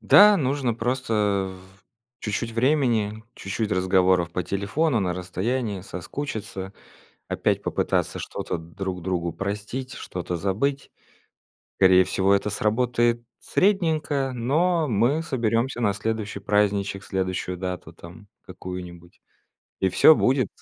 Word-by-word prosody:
Да, 205 Hz, 0 st, +7 dB
нужно 135 Hz, -5 st, 0 dB
просто 110 Hz, -5 st, 0 dB, 0.2 s
в -, -, -26 dB, 0.4 s
чуть-чуть 115 Hz, +2 st, -3 dB
времени, 115 Hz, -4 st, +1 dB
чуть-чуть 105 Hz, +2 st, -3 dB
разговоров 90 Hz, -2 st, +3 dB
по 90 Hz, -, -2 dB
телефону 105 Hz, -, 0 dB
на 90 Hz, -2 st, 0 dB
расстоянии, 100 Hz, +4 st, -2 dB
соскучиться, 95 Hz, 0 st, -6 dB, 0.6 s
опять -, -, 0 dB
попытаться -, -, -1 dB
что-то -, -, -4 dB
друг 90 Hz, +3 st, -6 dB
другу 85 Hz, -2 st, -2 dB
простить, 105 Hz, +8 st, -4 dB
что-то 90 Hz, -1 st, -5 dB
забыть. 110 Hz, +10 st, -1 dB, 0.9 s
Скорее 95 Hz, -1 st, +6 dB
всего, 95 Hz, +2 st, +2 dB
это 100 Hz, +1 st, +1 dB
сработает 120 Hz, +2 st, +1 dB, 0.2 s
средненько, 155 Hz, -8 st, +1 dB
но 155 Hz, +7 st, +1 dB
мы 120 Hz, +8 st, +2 dB
соберемся 120 Hz, -4 st, 0 dB
на 105 Hz, -3 st, +2 dB
следующий 105 Hz, 0 st, -3 dB
праздничек, 100 Hz, -1 st, 0 dB
следующую 95 Hz, -1 st, -2 dB
дату 90 Hz, -3 st, -5 dB
там 90 Hz, +6 st, -13 dB
какую-нибудь, 90 Hz, -1 st, -9 dB, 0.6 s
и 95 Hz, -, +3 dB
всё 155 Hz, -, +7 dB
будет! 130 Hz, -6 st, +2 dB
105 Hz, 115 wpm, -24 LUFS, 95-125 Hz, 0.9 s, Да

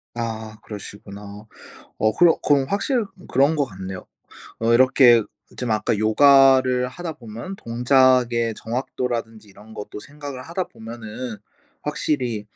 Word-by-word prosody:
아 110 Hz, -2 st, -5 dB
그러시구나. 100 Hz, 0 st, -10 dB, 0.5 s
어 110 Hz, 0 st, +2 dB
그럼 175 Hz, -1 st, +6 dB
그럼 140 Hz, -2 st, +4 dB
확실히 235 Hz, -, 0 dB, 0.3 s
그런 140 Hz, +4 st, +3 dB
것 145 Hz, -2 st, +1 dB
같네요. 95 Hz, -4 st, -8 dB, 0.5 s
어 115 Hz, +1 st, +2 dB
이렇게 125 Hz, -2 st, +6 dB, 0.3 s
좀 125 Hz, -3 st, -2 dB
아까 110 Hz, 0 st, 0 dB
요가를 130 Hz, +2 st, +5 dB
하다 165 Hz, +5 st, -6 dB
보면 120 Hz, -, -8 dB
동작의 125 Hz, -1 st, +2 dB
정확도라든지 115 Hz, -2 st, -4 dB
이런 105 Hz, +3 st, -15 dB
것도 105 Hz, 0 st, -8 dB
생각을 145 Hz, 0 st, -9 dB
하다 170 Hz, +5 st, -3 dB
보면은 115 Hz, 0 st, -8 dB, 0.4 s
확실히 125 Hz, -8 st, -2 dB
120 Hz, 275 characters per minute, -22 LUFS, 110-135 Hz, 0.5 s, 그럼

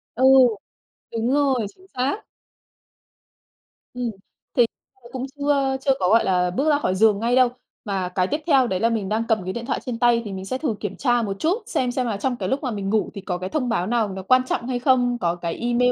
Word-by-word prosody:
Ừ, 255 Hz, -, 0 dB, 0.9 s
đúng 230 Hz, +2 st, -1 dB
rồi. 270 Hz, -6 st, +2 dB
Chính 375 Hz, 0 st, -21 dB
xác. 275 Hz, +12 st, -1 dB, 1.7 s
Ừ, 250 Hz, -, -6 dB, 0.5 s
thì 240 Hz, -, +5 dB, 0.5 s
cũng 260 Hz, 0 st, -4 dB
chưa 280 Hz, -2 st, +1 dB
chưa 270 Hz, -, +2 dB
có, 180 Hz, -, +1 dB
gọi 225 Hz, +1 st, +5 dB
là, 180 Hz, -1 st, +1 dB
bước 280 Hz, +11 st, 0 dB
ra 290 Hz, -1 st, +3 dB
khỏi 185 Hz, -8 st, 0 dB
giường 210 Hz, 0 st, +4 dB
ngay 235 Hz, +2 st, +1 dB
đâu. 255 Hz, -1 st, +5 dB, 0.4 s
Mà 190 Hz, -3 st, -2 dB
cái 185 Hz, -1 st, +2 dB
tiếp 300 Hz, +2 st, -2 dB
theo 270 Hz, -5 st, +4 dB
đấy 185 Hz, -3 st, -1 dB
là 230 Hz, -, +2 dB
mình 210 Hz, -4 st, -2 dB
đang 220 Hz, +2 st, 0 dB
cầm 220 Hz, -5 st, +1 dB
cái 185 Hz, -, -4 dB
điện 235 Hz, 0 st, -5 dB
thoại -, -, -1 dB
trên 235 Hz, -3 st, -4 dB
tay 240 Hz, -1 st, +4 dB
thì 200 Hz, -, -5 dB
mình 190 Hz, 0 st, -6 dB
sẽ 255 Hz, +6 st, -2 dB
thử 265 Hz, -7 st, -2 dB
kiểm 205 Hz, -2 st, -4 dB
tra 245 Hz, -3 st, +1 dB
một 195 Hz, -3 st, -4 dB
chút, 365 Hz, +9 st, 0 dB
xem 250 Hz, -1 st, -1 dB
xem 255 Hz, 0 st, -1 dB
là 210 Hz, -3 st, -2 dB
trong 250 Hz, +3 st, -1 dB
cái -, -, -3 dB
lúc 275 Hz, +3 st, -1 dB
mà 250 Hz, -, -1 dB
mình 200 Hz, -2 st, -3 dB
ngủ 215 Hz, 0 st, +1 dB
thì 200 Hz, -, -7 dB
có 180 Hz, -2 st, -3 dB
cái 185 Hz, +1 st, -5 dB
thông 255 Hz, -6 st, -1 dB
báo 185 Hz, -5 st, 0 dB
nào 225 Hz, -3 st, +1 dB
nó 190 Hz, 0 st, -6 dB
quan 255 Hz, +5 st, +4 dB
trọng 240 Hz, -, -2 dB
hay 250 Hz, -1 st, -1 dB
không, 245 Hz, -2 st, +2 dB
có 170 Hz, 0 st, +1 dB
cái 170 Hz, -1 st, -4 dB
email 245 Hz, +1 st, +2 dB
235 Hz, 240 wpm, -23 LUFS, 200-260 Hz, 1.7 s, thì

